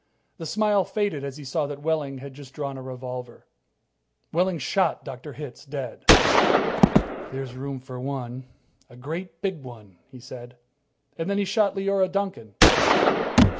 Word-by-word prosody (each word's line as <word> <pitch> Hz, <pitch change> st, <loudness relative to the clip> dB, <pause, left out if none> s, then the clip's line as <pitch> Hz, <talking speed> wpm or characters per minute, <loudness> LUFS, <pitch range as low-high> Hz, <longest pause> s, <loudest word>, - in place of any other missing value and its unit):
The 165 Hz, -, -6 dB
smile 210 Hz, +1 st, +2 dB
faded 200 Hz, -8 st, -2 dB
as 140 Hz, 0 st, -6 dB
he 150 Hz, -, -10 dB
saw 145 Hz, +2 st, -2 dB
that 145 Hz, 0 st, -8 dB
Wehling 150 Hz, -4 st, -2 dB
had 135 Hz, +1 st, -10 dB
just 135 Hz, -1 st, -14 dB
drawn 140 Hz, -2 st, -4 dB
a 130 Hz, -, -8 dB
revolver. 125 Hz, -1 st, -8 dB, 0.9 s
Wehling 180 Hz, +1 st, +1 dB
shot 170 Hz, +6 st, 0 dB
Dr. 135 Hz, +2 st, -8 dB
Hitz 145 Hz, -3 st, -9 dB
dead. 135 Hz, -5 st, -7 dB, 1.3 s
"There's 130 Hz, -1 st, -6 dB
room 135 Hz, +1 st, -6 dB
for 130 Hz, -1 st, -10 dB
one 130 Hz, -1 st, -6 dB, 0.4 s
a 120 Hz, -, -16 dB
great 165 Hz, +6 st, -8 dB
big 190 Hz, -6 st, -2 dB
one," 110 Hz, -8 st, -14 dB
he 130 Hz, -2 st, -13 dB
said. 120 Hz, 0 st, -11 dB, 0.6 s
And 165 Hz, +3 st, -3 dB
then 200 Hz, -, 0 dB
he 205 Hz, -, 0 dB
shot 200 Hz, +1 st, +1 dB
Leora 195 Hz, -1 st, 0 dB
Duncan. 190 Hz, -, -4 dB
140 Hz, 150 wpm, -24 LUFS, 130-180 Hz, 1.3 s, smile